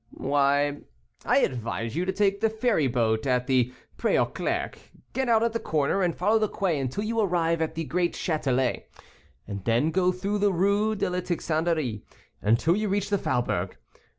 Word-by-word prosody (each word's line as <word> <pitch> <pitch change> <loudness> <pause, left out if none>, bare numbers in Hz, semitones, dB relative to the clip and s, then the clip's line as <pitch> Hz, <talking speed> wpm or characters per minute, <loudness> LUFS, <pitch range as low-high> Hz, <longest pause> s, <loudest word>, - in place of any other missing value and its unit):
"Why, 145 +1 +1 0.5
I - - +4
advise 115 -1 -2
you 175 +2 0
to 190 - 0
take 200 0 +1
the 225 - +3
ferry 220 - +1
boat 115 -1 0
at 125 -1 +1
the 125 -2 +2 0.3
Pré - - +2
aux - - +4
Clercs, - - -3 0.3
get 265 -2 -1
out 225 -1 +4
at 230 -1 0
the 230 - -1
corner, 155 +3 0
and 175 -3 +1
follow 210 +5 +3
the 215 -1 0
quay 175 -7 -1
until 135 +9 -2
you 230 +1 -1
arrive 170 -5 +1
at 160 - -2
the 165 - -2
great 175 +2 -1
Châtelet, 130 -7 0 0.6
and 100 -2 -6
then 120 +9 +2
go 185 +1 +2
through 200 +3 -2
the 205 0 +3
Rue 200 +4 +2
de 205 - -1
la 180 0 -1
Tixanderie, 160 - -1 0.4
until 115 - +3
you 210 0 -1
reach 205 +1 -1
the 200 - +2
faubourg. 95 - -1
170 Hz, 185 wpm, -26 LUFS, 130-200 Hz, 0.6 s, I